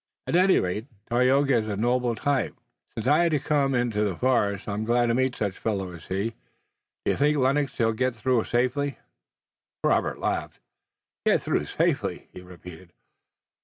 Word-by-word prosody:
"At - - -1
any 185 +2 +5
rate, 100 +6 -3 0.2
Tayoga 130 +2 +3
is 110 -1 -1
a 100 -2 -3
noble 120 +1 +1
type. 140 +3 -1 0.4
Since 115 - -4
I 145 +4 +4
had 170 -1 +3
to 150 - +2
come 140 -2 +1
into 120 -4 0
the 100 -4 -1
forest 105 -4 0
I'm 105 +1 -2
glad 120 +2 +2
to 115 - +1
meet 130 0 +1
such 100 -3 -3
fellows 95 -5 -3
as - - -15
he. 100 +4 -1 0.7
Do - - +3
you - - 0
think, 150 +2 +2
Lennox, 135 +1 +1
that - - -21
he'll 115 -1 +2
get 125 +2 -1
through 120 +1 +1
safely?" 130 +3 0 0.9
Robert - - +1
laughed. - - -3 0.7
"Get - - +2
through - - 0
safely?" - - -1
he 90 - -9
repeated. 90 -1 -13
120 Hz, 175 wpm, -26 LUFS, 105-135 Hz, 0.9 s, any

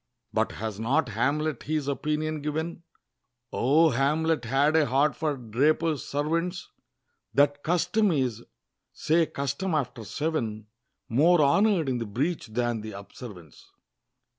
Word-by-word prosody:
But - - 0
has 110 -2 -5
not 130 +5 +1
Hamlet 145 +8 0
his 150 -2 -2
opinion 150 +2 -1
given 160 +3 -3 0.7
O 155 +6 +4
Hamlet 150 +2 +1
had 140 +6 +2
a 155 -3 +4
heart 135 +2 +2
for 150 -1 -1
Drapers' 145 +6 +1
servants! 165 +5 -2 0.7
"That 145 +1 +3
custom 185 +6 +2
is" 125 -7 0 0.5
say 165 +1 +1
custom 140 +6 -2
after 125 -5 -2
seven 110 -3 -3 0.4
"More 155 +7 +4
honor'd 190 +2 +3
in 125 -2 0
the 115 - -4
breach 140 - -2
than 120 0 -1
the 110 0 -7
observance." 100 - -11
145 Hz, 125 wpm, -27 LUFS, 120-160 Hz, 0.7 s, O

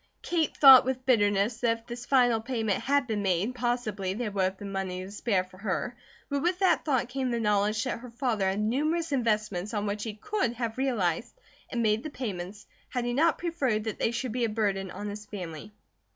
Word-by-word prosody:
Kate 330 -3 0
thought 270 -3 +10
with 255 0 -3
bitterness 205 -2 +3
that 230 -1 +1
if 230 - -22
this 240 0 -7
final 245 -4 +4
payment 225 -4 -1
had 280 0 +2
been 220 -4 -2
made 195 +4 0
possibly 225 -6 -2
there 225 -1 -3
would 195 -1 0
have 190 +1 -2
been 200 0 -7
money 185 -1 -3
to 195 - -10
spare 205 -2 0
for 185 0 -17
her; 195 +4 -2 0.3
but 280 0 -1
with 355 +3 +1
that 375 -1 +3
thought 260 -5 +1
came 260 +1 -2
the 235 -1 -1
knowledge 210 0 +1
that 255 - -3
her 250 +1 -10
father 230 -5 0
had 195 +2 -1
numerous 305 +9 0
investments 215 -5 0
on 205 0 -1
which 205 0 -2
he 215 -1 -4
could 390 - -1
have 235 0 -4
realized 235 - -1 0.3
and 235 -2 -1
made 215 0 +2
the 310 - -5
payments 205 -7 -6 0.2
had 245 -1 -2
he 240 - -1
not 320 +5 +3
preferred 275 -11 -1
that 220 -2 -4
they - - +2
should 240 +1 -3
be 245 +1 -1
a 230 - +2
burden 200 -3 -1
on 205 +3 -6
his 205 +1 -7
family. 180 -2 -7
225 Hz, 215 wpm, -28 LUFS, 205-255 Hz, 0.3 s, thought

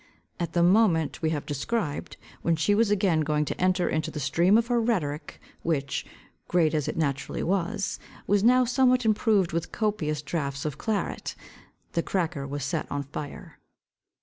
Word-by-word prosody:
At 170 -2 -3
the 175 - +3
moment 175 -5 +3
we 160 - +1
have 150 -3 -2
described, 150 - -3 0.2
when 170 - +2
she 160 +6 +2
was 215 +1 +3
again 190 -5 +2
going 150 0 +1
to - - -4
enter 185 0 +2
into 155 -1 -1
the 150 - -5
stream 170 +9 +3
of 230 - +2
her 240 0 +1
rhetoric, 170 -11 -2 0.2
which, 140 -4 -1 0.4
great 165 -3 +2
as 150 -3 0
it - - -3
naturally 140 -4 -1
was, 195 +3 -1 0.3
was 205 0 +2
now 250 +2 +5
somewhat 250 0 +3
improved 215 -4 +3
with 165 0 -2
copious 155 -9 -1
draughts 140 -2 -3
of 150 -4 -3
claret, 215 -3 -2 0.6
the 170 - 0
cracker 165 -7 -2
was 140 0 -4
set 155 +4 -2
on 145 0 -2
fire. 145 +1 -8
170 Hz, 170 wpm, -27 LUFS, 150-205 Hz, 0.6 s, now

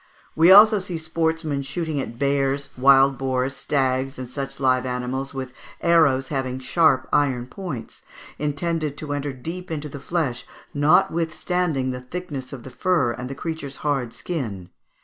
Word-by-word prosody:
133); - - -5
we 170 +3 +8
also 210 +2 +9
see 180 -3 -4
sportsmen 160 -2 -1
shooting 145 +1 -3
at 115 -2 -7
bears, 140 0 0
wild 135 0 +5
boars, 130 0 -1
stags, 135 -1 0
and 125 -1 -7
such 135 0 -5
live 130 -2 +2
animals 130 +2 -3
with 130 -2 -6 0.3
arrows 150 -6 +3
having 130 -3 -2
sharp 130 +1 +2
iron 130 -4 +2
points, 145 - -7 0.4
intended 150 0 -2
to 150 -2 -4
enter 145 0 -2
deep 165 +8 -7
into 155 -2 -4
the 140 -1 -8
flesh, 140 -4 -2 0.3
notwithstanding 165 -2 +1
the 125 0 -6
thickness 140 -1 -6
of 130 -4 -8
the 130 - -10
fur 160 -9 +1
and 125 +2 -6
the 135 - -5
creature's 145 -2 -5
hard 135 -5 0
skin. 105 - -5
140 Hz, 155 wpm, -23 LUFS, 130-160 Hz, 0.4 s, also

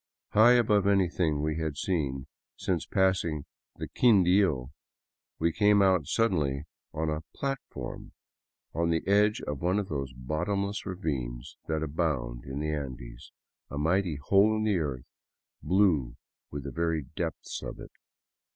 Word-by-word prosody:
High 110 +4 +6
above 105 -5 +3
anything 90 -6 +2
we 75 0 -1
had 80 -3 -3
seen 70 -8 -1 0.3
since 90 -4 -1
passing 95 -6 +1 0.3
the - - -5
Quindio, 95 - +3 0.7
we 85 +1 +1
came 105 +3 +4
out 95 -7 +3
suddenly 75 - +1 0.3
on 80 0 -1
a 75 0 -2
" - - -27
platform 135 -1 -5 0.3
'' - - -58
on 85 0 0
the 80 -1 0
edge 105 +2 +3
of 75 -2 -5
one 90 +3 +1
of 100 -2 -2
those 70 -3 -3
bottomless 90 +10 -2
ravines 70 -9 -4
that 80 -1 -1
abound 70 -6 -2
in 65 +2 -4
the 75 0 -1
Andes, 65 -4 -7 0.4
a 70 - -6
mighty 85 +2 +1
hole 100 +9 +3
in 110 - -1
the 105 -4 +2
earth, 70 -6 -3 0.6
blue 85 -11 +2 0.3
with 70 -1 -6
the - - -5
very 80 -2 0
depths 80 -4 -4
of - - -7
it. - - -10
80 Hz, 150 wpm, -29 LUFS, 70-100 Hz, 0.7 s, High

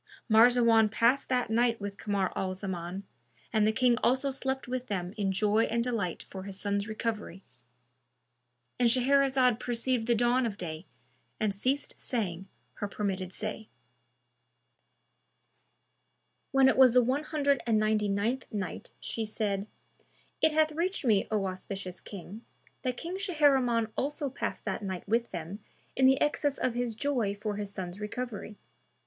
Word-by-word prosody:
Marzawan 230 -1 +6
passed 235 +5 +2
that 250 -3 0
night 230 0 +2
with 200 -1 -6
Kamar 200 -3 -1
al 185 -1 -2
Zaman, 185 -1 -5 0.5
and 215 -1 +4
the - - +4
King 245 +1 +3
also 265 +2 +2
slept 265 -1 -2
with 255 0 -3
them 185 -2 -3
in 200 -3 0
joy 210 +3 +2
and 235 +1 0
delight 220 -8 -2
for 190 - -8
his 195 0 -7
son's 200 0 -1
recovery.—And 125 - -6
Shahrazad 260 -1 +3
perceived 240 -1 0
the 235 - +4
dawn 240 +2 +2
of 205 -3 -5
day 160 -1 -6 0.5
and 215 -2 +1
ceased 260 +8 -1
saying 190 -6 -2 0.3
her 205 - -2
permitted 195 -3 -3
say. 215 +2 -5 2.8
When 270 -1 +5
it - - +3
was 260 -3 +7
the 250 0 +6
One 265 +5 0
Hundred 285 -4 +1
and 225 -2 +3
Ninety 215 -1 +2
ninth 220 +7 0
Night, 200 -4 -5
She 225 - -3
said, 210 -2 -2 0.7
It 315 - +5
hath 310 0 +3
reached 340 +1 -2
me, 210 -5 +3
O 210 -3 0
auspicious 185 0 -5
King, 200 +3 -9 0.4
that 250 -2 -2
King 360 +3 -5
Shahriman 270 - +2
also 285 +1 -2
passed - - -4
that - - -2
night 190 -2 -5
with 230 +3 +1
them 175 +3 -6 0.4
in 260 0 +5
the 265 +1 +4
excess 290 -1 +1
of 255 - 0
his 240 -2 -2
joy 235 -6 0
for 205 0 -4
his 205 -1 -4
son's 185 -1 -6
recovery. 210 -1 -5
220 Hz, 150 wpm, -30 LUFS, 195-255 Hz, 2.8 s, was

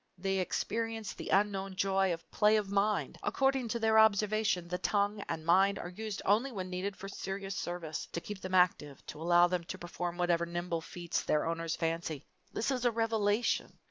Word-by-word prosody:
They 195 +1 0
experience 225 +3 -2
the - - -7
unknown 195 -1 +1
joy 195 0 +2
of 165 -1 -5
play 210 +1 +4
of 205 -2 -2
mind. 200 +1 0
According 270 -2 +1
to 235 +1 -2
their 220 -1 +4
observation 215 -3 +3
the 180 +1 -3
tongue 205 0 0
and 160 -1 -3
mind 190 +4 +4
are 175 - -5
used 215 +2 -5
only 225 +7 +3
when 185 -5 -5
needed 190 +2 -3
for 195 - -7
serious 195 0 -5
service: 175 -4 -4
to - - -2
keep 200 +2 -8
them 185 0 -2
active, 165 -6 +2
to 150 - -8
allow 175 +1 +5
them 175 -1 -1
to 185 - -6
perform 175 0 -5
whatever 170 -1 +1
nimble 175 -1 -2
feats 175 +1 -3
their 150 - +1
owners 165 0 -2
fancy 165 -3 -2 0.3
this 230 - -1
is 255 -2 -1
a 245 - +4
revelation! 225 -1 0
195 Hz, 190 wpm, -32 LUFS, 175-210 Hz, 0.3 s, allow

